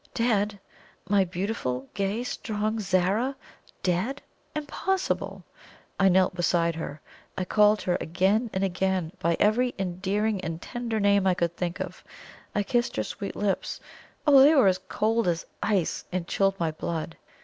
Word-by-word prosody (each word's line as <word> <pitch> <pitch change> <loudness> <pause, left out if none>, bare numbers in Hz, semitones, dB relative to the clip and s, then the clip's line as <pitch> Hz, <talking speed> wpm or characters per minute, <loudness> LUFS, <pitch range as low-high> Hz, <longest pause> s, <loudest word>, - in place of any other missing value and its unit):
Dead? 210 -4 +1 0.5
My 200 0 +4
beautiful, 175 - -3
gay, 200 +4 -1
strong 215 -2 -2
Zara 195 +7 +1 0.5
DEAD? 190 +10 0 0.4
Impossible! 365 +6 -2 0.6
I 195 0 +6
knelt 185 0 +4
beside 170 -1 +1
her; 155 -2 -6 0.4
I 185 - -1
called 210 +2 +4
her 180 -1 0
again 195 +8 +1
and 190 - -1
again 185 -2 0
by 170 -1 +1
every 245 +4 +2
endearing 195 +3 -1
and 165 -2 -4
tender 235 +1 -3
name 200 -1 +3
I 185 - +3
could 170 -1 -1
think 175 0 -3
of; - - -6 0.5
I 205 - +2
kissed 240 +3 0
her 110 - 0
sweet 200 - -6
lips. 200 -2 -1 0.5
Oh, 285 -3 +8
they 295 +4 +7
were 200 -10 +6 0.2
cold 225 0 +1
as 170 -1 0 0.2
ice, 200 -6 0
and 180 -2 -2
chilled 195 0 +1
my 165 -2 0
blood! 160 +1 -4
195 Hz, 150 wpm, -27 LUFS, 175-220 Hz, 0.6 s, Oh